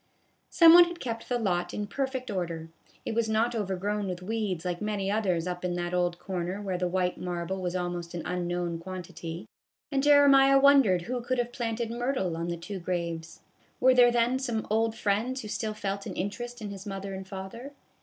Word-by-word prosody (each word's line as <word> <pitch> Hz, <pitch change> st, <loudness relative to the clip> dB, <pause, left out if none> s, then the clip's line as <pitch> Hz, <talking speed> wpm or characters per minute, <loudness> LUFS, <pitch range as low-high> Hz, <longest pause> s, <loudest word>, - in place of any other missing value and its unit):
Some 330 Hz, -1 st, +8 dB
one 350 Hz, 0 st, +10 dB
had 345 Hz, 0 st, -7 dB
kept 230 Hz, -5 st, -5 dB
the 245 Hz, -, +1 dB
lot 175 Hz, -6 st, -1 dB
in 210 Hz, -, -2 dB
perfect 260 Hz, +2 st, -3 dB
order. 170 Hz, -4 st, -3 dB, 0.4 s
It -, -, -2 dB
was 225 Hz, -1 st, 0 dB
not 225 Hz, +2 st, +2 dB
overgrown 205 Hz, -1 st, -2 dB
with 180 Hz, -1 st, -5 dB
weeds 200 Hz, -4 st, -2 dB
like 175 Hz, 0 st, -2 dB
many 205 Hz, -2 st, -1 dB
others 185 Hz, -6 st, 0 dB
up 180 Hz, 0 st, -4 dB
in 180 Hz, -1 st, -1 dB
that 175 Hz, 0 st, -3 dB
old 175 Hz, -1 st, +1 dB
corner 180 Hz, +1 st, -4 dB
where 190 Hz, -3 st, -3 dB
the 180 Hz, -, +1 dB
white 180 Hz, 0 st, -1 dB
marble 180 Hz, +1 st, -3 dB
was 180 Hz, 0 st, -2 dB
almost 175 Hz, -1 st, -3 dB
an 170 Hz, -, -4 dB
unknown 175 Hz, -1 st, -2 dB
quantity, 175 Hz, 0 st, -7 dB, 0.4 s
and 275 Hz, -1 st, +1 dB
Jeremiah 275 Hz, -1 st, +6 dB
won 280 Hz, 0 st, +7 dB
dered 185 Hz, -7 st, +1 dB
who 245 Hz, +5 st, -3 dB
could 255 Hz, +2 st, -1 dB
have 245 Hz, 0 st, -1 dB
planted 230 Hz, -1 st, -2 dB
myrtle 240 Hz, -7 st, -1 dB
on 165 Hz, +1 st, -3 dB
the 170 Hz, 0 st, -3 dB
two 190 Hz, +4 st, -6 dB
graves. 170 Hz, -2 st, -4 dB, 0.4 s
Were 260 Hz, 0 st, +6 dB
there 245 Hz, -1 st, +6 dB
then 240 Hz, +2 st, +2 dB
some 235 Hz, -5 st, -2 dB
old 225 Hz, +1 st, +2 dB
friends 225 Hz, +7 st, 0 dB
who -, -, -6 dB
still 215 Hz, 0 st, -3 dB
felt 200 Hz, -1 st, -3 dB
an -, -, -6 dB
interest 240 Hz, +4 st, -4 dB
in 205 Hz, -, -5 dB
his 200 Hz, +1 st, -8 dB
mother 195 Hz, 0 st, -5 dB
and 190 Hz, 0 st, -7 dB
father? 200 Hz, +8 st, -8 dB
200 Hz, 205 wpm, -28 LUFS, 180-240 Hz, 0.4 s, one